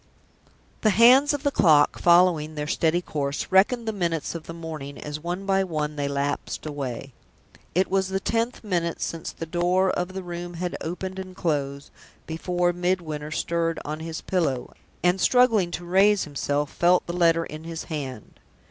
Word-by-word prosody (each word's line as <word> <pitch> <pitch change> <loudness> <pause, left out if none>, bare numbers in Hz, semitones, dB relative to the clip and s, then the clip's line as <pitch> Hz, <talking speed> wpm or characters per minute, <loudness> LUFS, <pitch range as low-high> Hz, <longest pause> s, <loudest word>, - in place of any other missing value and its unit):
The 215 - +4
hands 250 +7 +6
of 290 -1 -3
the 285 - +2
clock, 155 - +4
following 170 -3 +4
their 150 0 -3
steady 165 +3 +1
course, 140 -3 -2
reckoned 225 +5 +3
the 220 - 0
minutes 170 -5 -2
of 170 -2 -8
the - - -6
morning 155 -4 -7
as 150 0 -6
one 175 +4 -4
by 195 0 +2
one 155 -4 -3
they 145 -1 -1
lapsed 140 +2 -3
away. 135 -3 -5 0.6
It 185 +2 +3
was 190 0 +1
the 190 0 -1
tenth 230 +5 -1
minute 170 -5 -1
since 165 -1 -4
the 165 - -7
door 180 +3 +1
of 180 +1 -3
the 190 0 -5
room 175 0 -6
had 175 +1 -3
opened 185 +3 -5
and 185 -1 -8
closed, 140 -5 -2 0.3
before 175 +2 0
Midwinter 175 -4 -2
stirred 165 +1 -1
on 155 +1 -4
his 160 0 -5
pillow, 140 -9 -1 0.3
and, 180 +1 +2
struggling 230 -8 +4
to 175 +1 -6
raise 195 +3 +4
himself, 145 0 -2
felt 175 +1 +3
the 170 - -5
letter 165 -1 +3
in 155 +1 -9
his 165 -1 -5
hand. 135 -8 -7
170 Hz, 175 wpm, -25 LUFS, 155-185 Hz, 0.6 s, hands